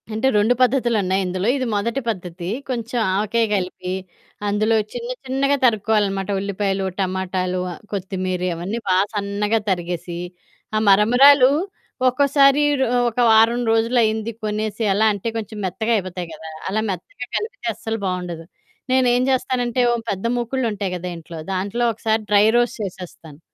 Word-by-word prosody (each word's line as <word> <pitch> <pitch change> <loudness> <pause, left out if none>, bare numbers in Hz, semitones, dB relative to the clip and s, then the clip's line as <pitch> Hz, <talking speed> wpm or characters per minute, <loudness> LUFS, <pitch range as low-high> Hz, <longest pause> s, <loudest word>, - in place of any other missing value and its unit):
అంటే, 220 +5 +1
2 210 +4 +4
పద్ధతులున్నాయి 235 -7 +2
ఇందులో, 185 +2 -2
ఇది 260 - -1
మొదటి 230 +6 -1
పద్ధతి. 180 -5 -4 0.2
కొంచెం 240 -1 -2 0.2
ఆవకాయ 215 +3 +1
గలిపి, 185 -1 -3 0.6
అందులో 215 +2 +2 0.2
చిన్న 240 0 -5 0.2
చిన్నగా 275 +2 +1
తరుక్కోవాలనమాట 205 -3 +1
ఉల్లిపాయలు, 195 0 -1
టమాటాలు, 185 -1 -1
ఆహ్, - - -13
కొత్తిమీరి 185 -2 -2
అవన్నీ 190 +7 -4
బా 185 - +3 0.2
సన్నగా 205 +2 0
తరిగేసి, 175 -1 -3 0.6
ఆహ్, 215 - +2
మరమరాలు 250 +7 +6 0.6
ఒక్కోసారి 275 +2 +4 0.2
రొ 265 - +3 0.2
ఒక 230 - -15
వారం 225 +2 +5
రోజులయింది 225 -1 +1
కొనేసి 215 +1 -2
అలా 215 +3 +3
అంటే, 200 +2 -5
కొంచెం 220 -1 -6
మెత్తగా 205 +6 -1
అయిపోతాయి 180 -3 -5
గదా! 160 +1 -9 0.2
అలా 215 +3 0
మెత్తగా 190 +6 -6
కలిపితే 460 +4 -5
అస్సలు 225 0 -4
బావుండదు. 180 -3 -4 0.5
నేనేం 250 -1 +3
జేస్తానంటే, 250 -1 0
ఓ - - +2 0.2
పెద్ద 195 +2 -4
మూకుడులుంటాయి 230 -6 -2
గదా 180 +1 -5
ఇంట్లో! 165 0 -9
దాంట్లో 200 +6 -1
ఒకసారి 220 0 0
డ్రై 205 0 +6
రోస్ట్ 240 +1 0
చేసేస్తాను. 170 -5 -9
210 Hz, 135 wpm, -21 LUFS, 185-240 Hz, 0.6 s, మరమరాలు